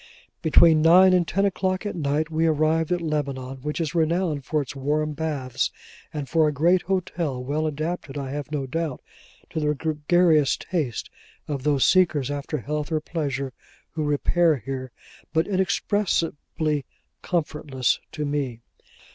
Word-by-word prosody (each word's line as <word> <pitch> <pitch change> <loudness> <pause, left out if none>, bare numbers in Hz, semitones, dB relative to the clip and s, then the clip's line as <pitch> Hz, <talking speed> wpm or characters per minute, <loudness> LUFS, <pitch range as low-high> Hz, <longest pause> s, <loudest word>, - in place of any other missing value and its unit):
Between 160 -1 +6
nine 180 +4 +7
and 175 -2 +3
ten 195 +3 +1
o'clock 190 0 -1
at 205 - -3
night, 155 0 -1
we 160 +1 +2
arrived 155 +1 +2
at 175 -1 +1
Lebanon 140 -4 -2
which 150 +5 -4
is 165 0 -2
renowned 165 -2 +1
for 155 - 0
its 135 - -9
warm 150 +3 0
baths, 145 -5 -2 0.4
and 145 -3 -4
for 160 +3 +3
a - - +1
great 170 +6 +3
hotel, 170 -8 -2
well 150 +4 -1
adapted, 155 -1 -4
I 135 -2 -4
have 145 +1 -5
no 145 -3 -2
doubt, 155 +1 -3 0.5
to - - -2
the 150 -1 +1
gregarious 155 0 +2
taste 150 - -3 0.4
of 145 -3 -3
those 140 -1 +2
seekers 160 -8 +3
after 145 +2 -3
health 150 +4 -3
or 155 - +2
pleasure 140 -5 -3 0.4
who 155 - -3
repair 155 +3 +2
here, 130 +2 -5 0.4
but 160 0 +3
inexpressibly 170 -6 0 0.4
comfortless 150 - -1
to 150 - -3
me. 140 -5 -2
155 Hz, 150 wpm, -24 LUFS, 140-165 Hz, 0.5 s, nine